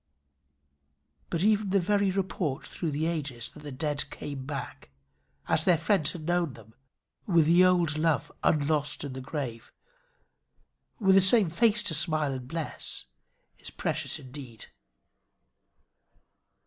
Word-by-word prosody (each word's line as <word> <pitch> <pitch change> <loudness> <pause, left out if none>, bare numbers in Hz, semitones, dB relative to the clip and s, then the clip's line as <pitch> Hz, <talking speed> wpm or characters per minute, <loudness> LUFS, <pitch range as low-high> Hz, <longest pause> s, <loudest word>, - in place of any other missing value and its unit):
But 170 +1 -1
even 210 -1 +2
the 195 +1 +3
very 200 +2 +1
report 185 -7 -2
through 170 - -4
the 150 +2 -1
ages 145 -8 -3
that - - -14
the 150 -1 -8
dead 145 +2 -2
came 135 -2 -7
back, 140 - -6 0.6
as 155 - +2
their 175 -1 +4
friends 165 -2 +1
had 170 -3 -8
known 175 -4 0
them, 110 -2 -16 0.5
with 170 -5 +4
the 170 +3 +5
old 175 -4 +3
love 160 -1 +1
unlost 150 -1 +1
in 140 -2 -5
the 130 - -6
grave, 130 -4 -5 1.3
with 195 -3 +4
the 195 - +7
same 190 -2 +4
face 215 +3 +3
to 185 - +2
smile 155 -1 +3
and 130 -1 -6
bless, 160 +2 -5 0.5
is - - -8
precious - - -1
indeed. 130 -3 -10
160 Hz, 135 wpm, -28 LUFS, 140-185 Hz, 1.3 s, the